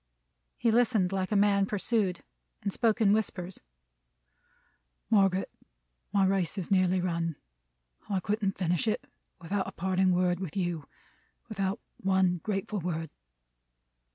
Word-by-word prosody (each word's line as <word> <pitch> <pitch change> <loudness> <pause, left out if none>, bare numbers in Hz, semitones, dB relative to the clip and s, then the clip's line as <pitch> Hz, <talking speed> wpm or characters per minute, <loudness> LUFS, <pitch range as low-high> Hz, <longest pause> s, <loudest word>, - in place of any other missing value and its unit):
He 235 - +2
listened 220 -5 +3
like 190 0 -1
a - - +2
man 200 -1 +4
pursued: 205 -2 0 0.4
and 200 -1 -1
spoke 230 0 +1
in 205 -2 +5
whispers. 190 -4 -2 1.5
"Margaret, 195 -3 +3 0.6
my 200 -1 +3
race 190 -1 +1
is 185 -1 -4
nearly 185 -1 +3
run, 170 -2 -1 0.7
I 195 -2 +1
couldn't 205 +1 -1
finish 175 +2 0
it, 215 - 0 0.3
without 190 +3 -2
a - - -5
parting 185 +1 +1
word 180 -1 +2
with 185 -2 -5
you. 175 -5 -2 0.6
Without 200 0 -1 0.2
one 190 -2 +2
grateful 205 +1 -2
word." 165 -3 -3
190 Hz, 125 wpm, -29 LUFS, 180-205 Hz, 1.5 s, in